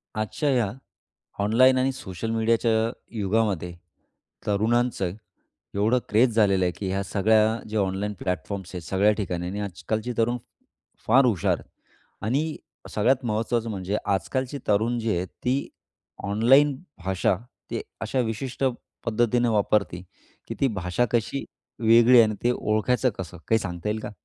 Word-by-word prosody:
आजच्या 110 Hz, +7 st, -1 dB
या 120 Hz, -7 st, +2 dB, 0.7 s
ऑनलाईन 130 Hz, +5 st, +5 dB
आणि 130 Hz, +1 st, +1 dB
सोशल 110 Hz, -4 st, -6 dB
मीडियाच्या 115 Hz, +1 st, +2 dB, 0.5 s
युगामध्ये 100 Hz, -4 st, 0 dB, 0.7 s
तरुणांचं 110 Hz, -1 st, +1 dB, 0.6 s
एवढं 110 Hz, +5 st, +3 dB
क्रेज 115 Hz, +2 st, +3 dB
झालेलं 100 Hz, -4 st, +3 dB
आहे 90 Hz, -, +1 dB
की 100 Hz, -, -4 dB
ह्या 95 Hz, +1 st, -1 dB
सगळ्या 110 Hz, +3 st, +3 dB
ज्या 110 Hz, 0 st, 0 dB
ऑनलाईन 100 Hz, +2 st, -1 dB
प्लॅटफॉर्म्स 90 Hz, +1 st, -4 dB
आहेत 90 Hz, -, -5 dB
सगळ्या 100 Hz, +2 st, +3 dB
ठिकाणी 90 Hz, -4 st, -2 dB
आणि 100 Hz, +3 st, -4 dB
आजकालचे 105 Hz, +4 st, -3 dB
तरुण 120 Hz, +2 st, +2 dB
फ 125 Hz, -, -34 dB
फार 130 Hz, +5 st, +6 dB
हुशार 110 Hz, -9 st, +1 dB, 0.6 s
आणि 145 Hz, +8 st, 0 dB, 0.3 s
सगळ्यात 125 Hz, +5 st, +2 dB
महत्त्वाचं 115 Hz, +1 st, -1 dB
म्हणजे 100 Hz, 0 st, -2 dB
आजकालचे 130 Hz, -, -1 dB
तरुण 110 Hz, +4 st, +2 dB
जे 110 Hz, -4 st, 0 dB
आहेत, 90 Hz, +2 st, -2 dB, 0.2 s
ती 130 Hz, +3 st, 0 dB, 0.6 s
ऑनलाईन 125 Hz, +8 st, +4 dB, 0.3 s
भाषा 95 Hz, 0 st, +1 dB, 0.3 s
ते -, -, -2 dB, 0.2 s
अशा 110 Hz, +4 st, -1 dB
विशिष्ट 125 Hz, +3 st, -3 dB, 0.4 s
पद्धतीनं 120 Hz, +1 st, +2 dB
वापरते 100 Hz, -4 st, +1 dB, 0.5 s
की -, -, -4 dB
ती 135 Hz, -, +4 dB
भाषा 95 Hz, +1 st, -1 dB
कशी 120 Hz, +4 st, 0 dB, 0.4 s
वेगळी 115 Hz, +2 st, +6 dB
आहे -, -, +10 dB
आणि 110 Hz, -, -2 dB
ते 120 Hz, -, +4 dB
ओळखायचं 125 Hz, +3 st, +1 dB
कसं, 90 Hz, -1 st, -6 dB
काही 110 Hz, -, +4 dB
सांगता 90 Hz, -1 st, -5 dB
येईल 110 Hz, +1 st, -1 dB
का? -, -, -6 dB
110 Hz, 140 wpm, -25 LUFS, 100-120 Hz, 0.7 s, आहे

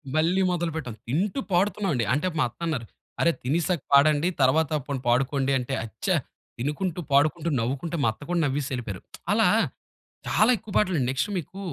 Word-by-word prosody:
మళ్ళీ 170 Hz, +5 st, +3 dB
మొదలుపెట్టాం. 160 Hz, -9 st, -3 dB
తింటూ 185 Hz, -, 0 dB
పాడుతున్నాం 195 Hz, +1 st, +1 dB
అండి. 115 Hz, -2 st, 0 dB
అంటే 150 Hz, +7 st, 0 dB
మా -, -, +4 dB
అత్తన్నారు, 155 Hz, -3 st, -3 dB, 0.4 s
"అరె! 170 Hz, -, +4 dB
తినేశాక 165 Hz, +3 st, 0 dB
పాడండి. 150 Hz, +4 st, +5 dB
తర్వాత 150 Hz, +4 st, +3 dB, 0.2 s
పోనీ 140 Hz, -2 st, -2 dB
పాడుకోండి" 135 Hz, +2 st, +1 dB
అంటే, 125 Hz, +2 st, -4 dB
అచ్చ 110 Hz, 0 st, -10 dB, 0.5 s
తినుకుంటూ, 155 Hz, +7 st, -2 dB
పాడుకుంటూ, 150 Hz, +4 st, +3 dB
నవ్వుకుంటే 135 Hz, +8 st, -2 dB
మా -, -, +4 dB
అత్త 110 Hz, -, -16 dB
కూడా 175 Hz, -, +1 dB
నవ్వేసెళ్ళిపోయారు. 130 Hz, -8 st, -3 dB, 0.3 s
అలా -, -, +4 dB, 0.8 s
చాలా 215 Hz, +4 st, +4 dB
ఎక్కువ 215 Hz, -1 st, -12 dB
పాటలు. 185 Hz, -7 st, +2 dB
నెక్స్ట్ 135 Hz, +8 st, -1 dB
మీకు 185 Hz, +4 st, -6 dB
150 Hz, 150 wpm, -26 LUFS, 135-175 Hz, 0.8 s, పాడండి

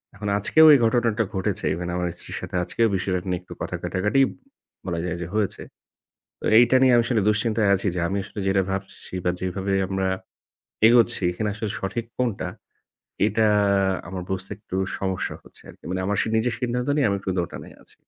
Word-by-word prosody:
এখন 105 Hz, -, -6 dB
আজকেও 155 Hz, +10 st, +5 dB
এই 140 Hz, -, +6 dB
ঘটনাটা 115 Hz, -1 st, +2 dB
ঘটেছে। 95 Hz, -1 st, -2 dB
Even 85 Hz, +2 st, -4 dB
আমার 90 Hz, 0 st, -1 dB
স্ত্রীর -, -, -5 dB
সাথে -, -, -6 dB
আজকেও 115 Hz, +5 st, +1 dB
বিষয়টা 90 Hz, -1 st, -1 dB
নিয়ে 90 Hz, -1 st, -1 dB
একটু 90 Hz, -, -11 dB
কথা -, -, -3 dB
কাটাকাটি 105 Hz, +8 st, +1 dB, 0.6 s
বলা 85 Hz, -2 st, -2 dB
যায় 90 Hz, -1 st, -3 dB
যে 85 Hz, -, -4 dB
হয়েছে। 105 Hz, -2 st, -1 dB, 0.8 s
তো -, -, -7 dB
এইটা 120 Hz, +2 st, +6 dB
নিয়ে 130 Hz, -2 st, +5 dB
আমি 120 Hz, -, +4 dB
আসলে 120 Hz, -4 st, +1 dB
দুশ্চিন্তায় 105 Hz, 0 st, +1 dB
আছি 100 Hz, +1 st, -2 dB
যে -, -, -1 dB
আমি 100 Hz, +2 st, -2 dB
আসলে 105 Hz, -, -8 dB
যেটা 95 Hz, 0 st, +3 dB
ভাবছি 95 Hz, -1 st, -6 dB
বা, 90 Hz, -, +1 dB
যেভাবে 95 Hz, +1 st, -2 dB
আমরা 95 Hz, 0 st, -1 dB, 0.8 s
এগোচ্ছি 120 Hz, -2 st, +4 dB
এখানে 105 Hz, +4 st, -2 dB
আসলে 110 Hz, 0 st, -4 dB
সঠিক 110 Hz, +4 st, -3 dB
কোনটা? 120 Hz, -5 st, -1 dB, 0.8 s
এটা 110 Hz, +1 st, +2 dB, 0.6 s
আমার 95 Hz, -1 st, -5 dB
বুঝতে 95 Hz, +1 st, -3 dB
একটু 100 Hz, -3 st, -6 dB, 0.2 s
সমস্যা 95 Hz, -2 st, -2 dB
হচ্ছে -, -, -17 dB
আরকি। -, -, -20 dB
মানে 95 Hz, 0 st, -2 dB
আমার 105 Hz, 0 st, 0 dB
সি -, -, -2 dB
নিজের 115 Hz, +1 st, +1 dB
সিদ্ধান্ত 125 Hz, +1 st, -1 dB
নিয়ে 140 Hz, -, +3 dB
আমি 100 Hz, -, +1 dB
একটু 95 Hz, -, -4 dB
দোটানায় 85 Hz, -, -7 dB
আছি। -, -, -14 dB
100 Hz, 185 wpm, -24 LUFS, 95-115 Hz, 0.8 s, এই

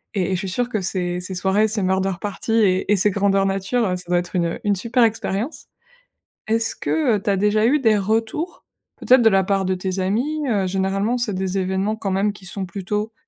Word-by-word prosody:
et 185 Hz, -1 st, 0 dB
et -, -, +1 dB
je -, -, -2 dB
suis 190 Hz, -1 st, -4 dB
sûre 245 Hz, +6 st, -1 dB
que 215 Hz, -, -1 dB
ces 180 Hz, -1 st, -2 dB
ces 185 Hz, +1 st, -6 dB
soirées, 195 Hz, +4 st, +2 dB
ces 215 Hz, -1 st, -2 dB
murder 190 Hz, +1 st, +1 dB
party 210 Hz, +2 st, -3 dB
et 195 Hz, -3 st, +2 dB
et -, -, +6 dB
ces 205 Hz, +3 st, +3 dB
grandeurs 195 Hz, 0 st, +2 dB
nature, 195 Hz, +5 st, 0 dB
heu, 180 Hz, -, 0 dB
ça 180 Hz, -, -8 dB
doit 175 Hz, 0 st, +3 dB
être 175 Hz, +1 st, -7 dB
une 170 Hz, -1 st, 0 dB
une 205 Hz, -1 st, +2 dB
super 235 Hz, +6 st, 0 dB
expérience. 225 Hz, +4 st, -2 dB, 0.8 s
Est-ce 225 Hz, 0 st, 0 dB
que, 275 Hz, -9 st, +1 dB
heu, -, -, -7 dB
tu -, -, -1 dB
as 195 Hz, -, +2 dB
déjà 210 Hz, +2 st, +2 dB
eu 290 Hz, +5 st, +3 dB
des 220 Hz, -4 st, +3 dB
retours 225 Hz, -, -2 dB, 0.3 s
peut-être 255 Hz, 0 st, +4 dB
de 225 Hz, -, +7 dB
la 195 Hz, -1 st, +3 dB
part 195 Hz, -1 st, +1 dB
de 185 Hz, 0 st, 0 dB
tes 185 Hz, +1 st, -3 dB
amis, 260 Hz, +11 st, -1 dB
heu? 195 Hz, -4 st, +1 dB
Généralement, 195 Hz, +5 st, 0 dB
c'est 235 Hz, -4 st, -1 dB
des 190 Hz, 0 st, -2 dB
événements 190 Hz, +3 st, -1 dB
quand 200 Hz, -3 st, -3 dB
même 200 Hz, +2 st, +1 dB
qui 195 Hz, -2 st, -14 dB
sont 190 Hz, +2 st, -4 dB
plutôt, 210 Hz, +4 st, -4 dB
200 Hz, 230 wpm, -21 LUFS, 190-220 Hz, 0.8 s, de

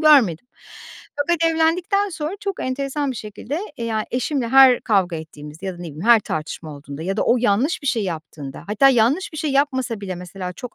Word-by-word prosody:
görmedim. 250 Hz, -, +5 dB, 0.7 s
Fakat 330 Hz, +3 st, +1 dB
evlendikten 345 Hz, +5 st, +1 dB
sonra 320 Hz, -1 st, -4 dB
çok 400 Hz, -2 st, -4 dB
enteresan 275 Hz, +2 st, -2 dB
bir 255 Hz, -, -5 dB
şekilde, 220 Hz, -, -5 dB, 0.2 s
eee, 235 Hz, -, -4 dB
ya, 220 Hz, -2 st, -1 dB
eşimle 255 Hz, 0 st, -1 dB
her 265 Hz, 0 st, +7 dB
kavga 190 Hz, -5 st, +1 dB
ettiğimizde 155 Hz, +2 st, -9 dB
ya 190 Hz, -, -2 dB
da -, -, -13 dB
ne -, -, -8 dB
bileyim 160 Hz, +1 st, -7 dB
her 235 Hz, -1 st, +7 dB
tartışma 155 Hz, -3 st, -5 dB
olduğunda 140 Hz, +1 st, -8 dB
ya 190 Hz, +3 st, -2 dB
da -, -, +1 dB
o 245 Hz, -, +3 dB
yanlış 240 Hz, +7 st, +1 dB
bir 280 Hz, -, -6 dB
şey 235 Hz, -5 st, +1 dB
yaptığında 155 Hz, -5 st, -7 dB
hatta 215 Hz, +7 st, +4 dB
yanlış 265 Hz, +9 st, +2 dB
bir 310 Hz, -, -6 dB
şey 310 Hz, -1 st, -1 dB
yapmasa 260 Hz, -5 st, 0 dB
bile 190 Hz, -2 st, -4 dB
mesela 180 Hz, +1 st, -7 dB
çok 245 Hz, +7 st, -9 dB
235 Hz, 200 wpm, -21 LUFS, 180-285 Hz, 0.7 s, her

